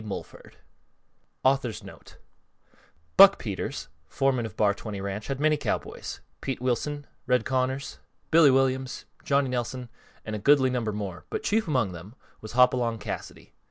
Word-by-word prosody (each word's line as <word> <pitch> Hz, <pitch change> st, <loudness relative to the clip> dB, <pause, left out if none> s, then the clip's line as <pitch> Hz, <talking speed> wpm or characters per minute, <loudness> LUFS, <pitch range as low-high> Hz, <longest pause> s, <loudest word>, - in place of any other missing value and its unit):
Mulford_ 105 Hz, -2 st, -8 dB, 0.9 s
_Buck 115 Hz, -9 st, +1 dB
Peters, -, -, -4 dB, 0.2 s
foreman 130 Hz, -, 0 dB
of -, -, -14 dB
Bar 105 Hz, -1 st, +3 dB
20 100 Hz, -1 st, -6 dB
Ranch 100 Hz, +2 st, -4 dB
had 135 Hz, -1 st, -3 dB
many 155 Hz, 0 st, +3 dB
cowboys; -, -, -4 dB, 0.2 s
Pete 135 Hz, -2 st, -3 dB
Wilson, 135 Hz, +4 st, -1 dB, 0.2 s
Red 125 Hz, -2 st, +2 dB
Connors, 130 Hz, +1 st, -1 dB, 0.3 s
Billy 160 Hz, -2 st, +7 dB
Williams, 130 Hz, 0 st, +1 dB, 0.2 s
Johnny 140 Hz, -1 st, +2 dB
Nelson, 125 Hz, 0 st, -3 dB, 0.4 s
and 110 Hz, -, -4 dB
a -, -, -4 dB
goodly 130 Hz, +2 st, +4 dB
number 120 Hz, -4 st, -1 dB
more, 100 Hz, -4 st, -5 dB
but -, -, -3 dB
chief 220 Hz, -1 st, +1 dB
among 125 Hz, -, +1 dB
them 90 Hz, +7 st, -10 dB, 0.3 s
was 110 Hz, -, -9 dB
Hopalong 125 Hz, -2 st, +3 dB
Cassidy. -, -, -7 dB
125 Hz, 135 wpm, -27 LUFS, 110-135 Hz, 0.9 s, Billy